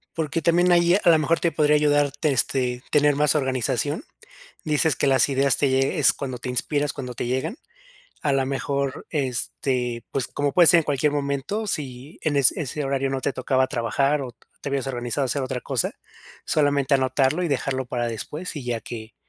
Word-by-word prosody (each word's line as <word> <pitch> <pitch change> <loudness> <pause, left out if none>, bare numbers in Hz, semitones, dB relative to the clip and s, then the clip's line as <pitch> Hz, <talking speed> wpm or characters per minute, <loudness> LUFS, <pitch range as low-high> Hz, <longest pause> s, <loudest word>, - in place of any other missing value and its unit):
Porque 160 0 -2
también 175 +3 +3
ahí 175 0 +4
a - - +4
lo 165 - +6
mejor 165 +2 +1
te 170 - +1
podría 150 -1 +3
ayudar, 145 -1 +3
te 145 +1 -1
este, 125 -1 0
tener 145 -1 +4
más 150 +1 +2
organización. 130 +1 -1 0.6
Dices 155 0 +2
que - - 0
las 135 0 +4
ideas 135 -1 +2
te 140 - +2
lle 135 +5 +1
es 130 - +5
cuando 130 -2 -5
te 125 - -6
inspiras, 145 +4 -1
cuando 125 -3 -6
te 120 - -4
llegan, 130 - -2 0.6
a 145 - +1
lo 135 -1 +1
mejor, 140 0 -3
este, 125 -3 -2
pues, 135 -2 -2
como 145 0 -2
puede 175 -2 +6
ser 175 0 +7
en - - -2
cualquier 145 0 0
momento, 145 +9 -2
si 140 -4 -5
en 155 -2 0
es 140 -2 +5
ese 150 0 -4
horario 135 0 -1
no 135 0 -3
te 140 - -1
tocaba 130 0 +1
trabajar 140 +3 0
o 125 -3 -7 0.3
te - - -4
hubieras 140 -1 -2
organizado 125 +2 -2
hacer 135 +2 -1
otra 130 -1 -4
cosa, 130 -5 -1 0.5
solamente 145 -2 +1
anotarlo 135 +4 +2
y - - 0
dejarlo 130 -2 -1
para 120 -1 -2
después 150 - -6
y 145 - -5
ya 120 -2 -2
que 110 -1 -9
140 Hz, 195 wpm, -23 LUFS, 130-150 Hz, 0.6 s, ser